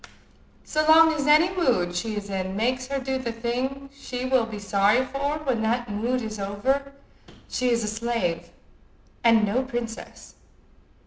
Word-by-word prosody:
So 310 0 0
long 320 0 +7
as 295 -2 -2
any 325 +5 +5
mood 235 - +1
she 215 +4 -2
is 205 -1 -5
in 190 -1 -3
makes 255 +4 -1
her 275 +1 -2
do 265 0 -2
the 240 -3 -3
thing 255 +4 -3
she 255 -2 -5
will 255 -3 +2
be 220 -2 -7
sorry 205 +5 +2
for 280 +3 -2
when 255 -6 0
that 235 +1 -1
mood 240 +4 -1
is 215 -1 -5
over, 265 +8 -1 0.5
she 250 0 -1
is 235 -1 +1
a - - -2
slave, 210 -7 -2 0.7
and 230 -2 +5
no 215 +6 +1
princess. 240 -3 -6
240 Hz, 165 wpm, -25 LUFS, 215-265 Hz, 0.7 s, long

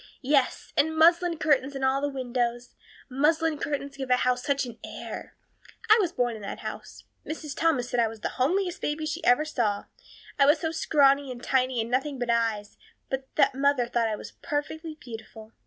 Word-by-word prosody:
Yes, 270 -1 +1
and 315 +1 +2
muslin 340 +1 +4
curtains 285 -3 +1
in 270 - -4
all 265 +1 +2
the 285 - 0
windows. 245 -2 -2 0.3
Muslin 305 +3 +1
curtains 280 -1 -3
give 265 -2 -5
a 250 - +6
house 250 0 +1
such 280 -1 0
an 235 -2 -10
air. - - -8 0.6
I 440 - +8
was 355 -4 0
born 245 -7 0
in 215 - -9
that 200 - -6
house. - - -8 0.2
Mrs. 305 -2 -6
Thomas 300 -7 +1
said 245 - +1
I 230 - +4
was 220 -1 -9
the - - -1
homeliest 355 +7 +1
baby 300 +1 -2
she 310 - -4
ever 245 +5 +4
saw, 225 -9 -1 0.5
I 275 - +6
was 295 +3 +6
so 320 - -1
scrawny 280 -4 +3
and 245 -1 -9
tiny 255 -2 +1
and 225 +1 -2
nothing 270 +2 0
but 245 -1 -1
eyes, 225 -3 -1 0.3
but 265 0 -3
that - - +4
mother 275 -2 +2
thought 235 -1 0
I 215 - -1
was - - -9
perfectly 310 +2 -4
beautiful. 220 -2 -10
270 Hz, 195 wpm, -27 LUFS, 245-300 Hz, 0.6 s, I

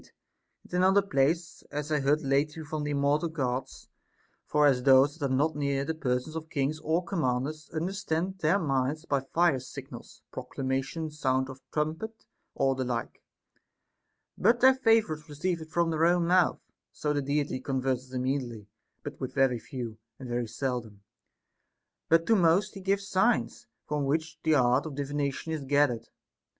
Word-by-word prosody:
And - - -18
in - - +1
another 190 +2 +4
place, 165 0 0
As 150 +1 -4
I 150 - +2
heard 145 +3 +2
lately 145 +3 0
from 155 0 -4
th' - - -3
immortal 145 +3 +1
Gods.* 130 -5 -3 0.6
For 150 0 +3
as 135 -3 +4
those 135 +3 +5
that 140 -2 -1
are 130 - +1
not 150 +4 +1
near 140 -1 0
the 160 - -1
persons 135 0 -2
of 160 -1 -5
kings 145 0 -1
or 160 +3 0
com 170 0 -2
manders 135 +4 -2
understand 180 +1 -2
their 165 +4 +3
minds 145 -1 -1
by 140 -4 +1
fire 160 +1 +2
signals, 130 +1 -10
proclamation, 135 +4 -3
sound 130 -3 0
of 130 0 -10
trumpet, 160 +9 -3 0.3
or 135 0 +2
the 130 0 -2
like, 120 -2 -4 1.1
but 240 +1 +3
their 260 +1 +7
favorites 220 - +2
receive 165 +4 -2
it 160 - -9
from 170 0 +1
their 160 +1 +3
own 175 0 +3
mouth; 180 +1 +3 0.3
so 150 -1 -2
the 145 - 0
Deity 140 -1 -1
converses 130 -1 -2
immediately 125 -4 -2 0.4
but 145 -1 -7
with 130 - -4
very 130 -3 +3
few, 115 -3 -7 0.2
and 130 - -8
very 120 -1 -2
seldom; 115 -3 -4 1.1
but 165 0 +4
to 225 - +4
most 185 +2 +3
he 195 - -8
gives 195 +1 0
signs, 220 +4 +1 0.2
from 150 -1 -1
which 160 +3 -1
the 160 -1 +3
art 125 +2 +3
of 145 - -7
divination 145 +2 -2
is 155 -3 -3
gathered. 135 -4 +1
145 Hz, 165 wpm, -29 LUFS, 135-165 Hz, 1.1 s, their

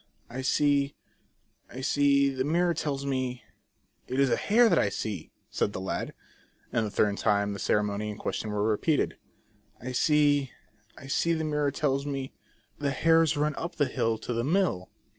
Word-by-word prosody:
" - - -40
I 130 +2 -4
see, 140 +1 +2 0.7
I 130 - -8
see, 140 0 +3
the 130 -1 -2
mirror 170 +4 +2
tells 140 -3 -3
me, 130 -2 -2 0.6
It 130 +2 -2
is 135 -2 +3
a - - +4
hare 235 +3 +4
that - - +3
I 100 - +2
see," 100 -4 -5 0.2
.said 100 - 0
the - - -4
lad. 95 - -4 0.6
A 110 -2 +1
third 100 0 +1
time 100 -1 +1
the 100 - -6
ceremony 105 0 0
and 105 - -7
question 110 - -3
were 105 0 -1
repeated. 125 +8 +1 0.3
" 105 -1 -37
I 125 +2 -6
see, 145 0 +2 0.4
I - - -11
see, 165 +5 +1
the 160 -1 -1
mirror 150 -2 0
tells 140 0 -1
me, 135 -2 -4 0.5
The 145 -1 0
hares 160 +2 +3
run 150 +1 +1
up 170 - -5
the 145 - +2
hill 115 -3 -1
to 120 - -5
the 115 0 -1
mill." 155 - 0
135 Hz, 180 wpm, -28 LUFS, 110-150 Hz, 0.7 s, a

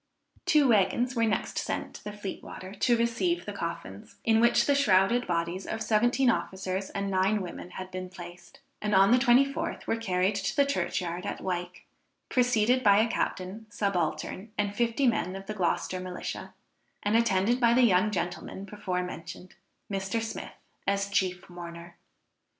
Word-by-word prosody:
Two 295 -4 +5
waggons 230 +4 +2
were 230 -1 +3
next 210 - -1
sent - - -3
to - - -11
the 210 - -5
Fleet 205 -2 -6
water 185 +1 -9
to 240 +2 +2
receive 235 +10 0
the 205 - -5
coffins, 170 - -6
in 225 -1 +4
which 235 +1 +4
the 285 - +3
shrouded 235 -2 +3
bodies 170 +2 -2
of 220 0 -3
seventeen 240 +5 +2
officers 190 -4 -1
and 200 -1 -3
nine 190 +3 +2
women 180 -1 -7
had 185 +1 -8
been 185 0 -5
placed, 175 -1 -12 0.2
and 210 -1 +1
on 195 +2 +6
the 250 - +6
24th 270 +2 +2
were - - +1
carried 190 -3 +1
to 200 -1 -2
the 280 - +4
church 185 -11 -1
yard 175 0 -4
at - - -4
Wyke, 180 0 -4 0.4
preceded 250 0 +3
by 200 -2 +6
a 220 +2 +4
captain, 210 0 -3
subaltern 200 +1 -2
and 205 -1 0
fifty 235 +4 +1
men 205 -6 +1
of 195 0 -7
the 215 - -4
Gloucester 185 -1 -1
Militia, 180 0 -6 0.5
and 205 +2 +1
attended 230 +1 +3
by 235 -1 +4
the 255 - +5
young 200 -2 +4
gentleman 180 0 -4
before 190 -3 -3
mentioned, 175 +1 -8 0.3
Mr. 195 +2 -2
Smith 225 0 -5 0.3
as 200 0 +1
chief 185 -2 0
mourner. 170 -1 -9
200 Hz, 170 wpm, -28 LUFS, 185-230 Hz, 0.5 s, on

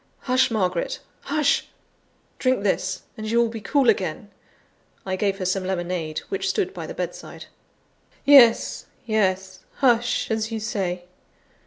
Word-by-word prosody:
"Hush, 255 0 +2
Margaret! 185 -6 -1 0.3
hush! 295 -1 +1 0.7
drink 255 -5 +1
this, 190 -1 -1
and 215 0 -5
you 230 - +1
will 235 -1 +3
be 225 -1 -7
cool 275 +4 +2
again." - - 0 0.7
I 190 -1 -1
gave 195 0 0
her 185 - -4
some 190 +1 0
lemonade, 175 -4 -3
which 390 - -1
stood 390 -3 -1
by - - -6
the - - -7
bedside. - - -6 0.8
"Yes, 265 -5 +6 0.2
yes; 190 -4 0 0.2
hush, 240 -3 +2
as 220 0 -1
you 225 - -2
say. 190 -5 -3
215 Hz, 140 wpm, -24 LUFS, 190-245 Hz, 0.8 s, Yes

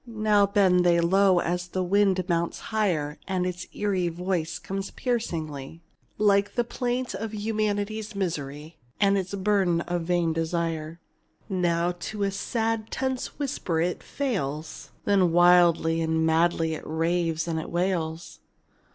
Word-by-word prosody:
Now 215 -3 +3
bend 190 -3 +4
they 170 -1 +4
low 185 +1 +4
as 180 +1 -2
the 185 +1 -2
wind 190 -1 +2
mounts 170 -1 0 0.2
higher, 165 -9 0
And 185 -1 0
its 180 0 -4
eerie 195 -4 0
voice 170 -2 -2
comes 195 +4 -5
piercingly, 165 - -3 0.3
Like 205 -1 +3
the 240 - +2
plaint 245 +1 -2
of 220 0 -5
humanity's 215 0 -2
misery, 155 -4 -4 0.2
And 200 -1 +4
its 195 0 -2
burden 190 -4 +2
of 175 0 -2
vain 170 -1 +1
desire. 165 0 -2 0.5
Now 175 -2 +1
to 205 +3 -4
a 195 - +1
sad, 225 +2 -2
tense 260 -1 -3
whisper 265 - -2
it 175 +2 -1
fails, 160 - -4 0.2
Then 190 -4 +3
wildly 175 -1 +5
and 160 0 +1
madly 160 0 +2
it 155 - -6
raves 165 0 -1
and 160 -1 -1
it 160 - -6
wails. 170 -2 -2
180 Hz, 140 wpm, -26 LUFS, 165-205 Hz, 0.5 s, wildly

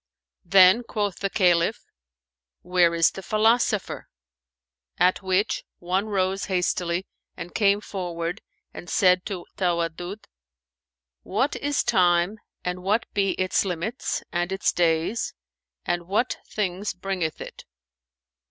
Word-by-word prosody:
Then 190 +4 +7
quoth 210 -4 -3
the 195 - -1
Caliph, 180 +1 +2 0.8
"Where 180 -1 +3
is 165 -1 +4
the 195 - -8
philosopher[FN#429]?"; 215 +1 +1 0.9
at 180 +3 +3
which 190 +2 0
one 185 +4 -1
rose 195 -1 0
hastily 180 -1 -1 0.3
and 175 - -7
came 205 -1 +3
forward 175 -4 -4 0.3
and 175 - -9
said 180 -1 +3
to 185 -4 -5
Tawaddud, 175 +2 -2 1.0
"What 260 +9 -1
is 290 0 0
Time 175 +3 +2 0.3
and 180 0 -3
what 205 +5 +1
be 195 -1 +1
its 185 0 +1
limits, 190 +6 -3
and 175 +1 -1
its 195 +1 +1
days, 170 +5 0 0.5
and 175 -1 -2
what 210 +6 0
things 195 -1 -2
bringeth 180 -4 -3
it?" - - -9
185 Hz, 115 wpm, -25 LUFS, 175-205 Hz, 1.0 s, Then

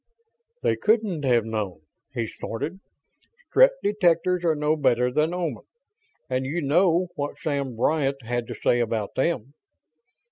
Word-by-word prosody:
"They - - +2
couldn't 210 -8 +1
have 120 -4 +3
known!" 105 -7 -3 0.3
he 120 -4 -2
snorted. 145 - -5 0.7
"Strett - - +6
detectors 180 -3 +2
are 165 -2 +2
no 150 +1 +1
better 125 -4 +2
than 155 +5 +1
Oman, 180 -1 -3 0.7
and 130 0 -1
you 145 +6 -2
know 170 +4 +2
what 145 0 -4
Sam 140 -5 -2
Bryant 135 +2 0
had 120 0 -2
to - - -6
say 120 - +2
about 115 -3 -1
them." 135 -3 -1
145 Hz, 140 wpm, -25 LUFS, 120-170 Hz, 0.7 s, Strett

